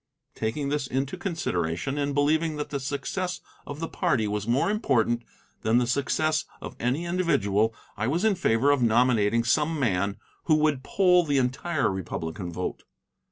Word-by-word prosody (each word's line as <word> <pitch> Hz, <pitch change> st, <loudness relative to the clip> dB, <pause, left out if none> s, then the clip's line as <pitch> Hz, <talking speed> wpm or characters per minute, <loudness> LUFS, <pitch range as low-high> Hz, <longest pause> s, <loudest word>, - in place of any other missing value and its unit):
Taking 140 Hz, +6 st, -2 dB
this 145 Hz, -2 st, -1 dB
into 135 Hz, +5 st, -2 dB
consideration, 135 Hz, -, -2 dB
and 140 Hz, -1 st, -1 dB
believing 155 Hz, +2 st, +2 dB
that 150 Hz, 0 st, -5 dB
the 140 Hz, -, -2 dB
success 145 Hz, +7 st, -3 dB, 0.3 s
of 145 Hz, +1 st, -6 dB
the 165 Hz, -, -3 dB
party 110 Hz, -9 st, 0 dB
was 105 Hz, 0 st, -3 dB
more 130 Hz, +11 st, +2 dB
important 120 Hz, -, +1 dB, 0.4 s
than 110 Hz, +2 st, +2 dB
the 125 Hz, -, +3 dB
success 140 Hz, +5 st, 0 dB
of -, -, -8 dB
any 130 Hz, +8 st, -1 dB
individual, 115 Hz, -, +1 dB, 0.2 s
I 105 Hz, +2 st, -2 dB
was 170 Hz, -, 0 dB
in 220 Hz, -, +4 dB
favor 140 Hz, -6 st, +2 dB
of 145 Hz, -3 st, +2 dB
nominating 115 Hz, -1 st, +3 dB
some 150 Hz, +6 st, +1 dB
man 100 Hz, -5 st, 0 dB, 0.3 s
who 155 Hz, -, +4 dB
would 150 Hz, -3 st, +2 dB
poll 180 Hz, +3 st, +3 dB
the 145 Hz, -3 st, 0 dB
entire 130 Hz, -, 0 dB
Republican 90 Hz, -1 st, -5 dB
vote. 90 Hz, +2 st, -4 dB
135 Hz, 160 wpm, -26 LUFS, 115-155 Hz, 0.4 s, in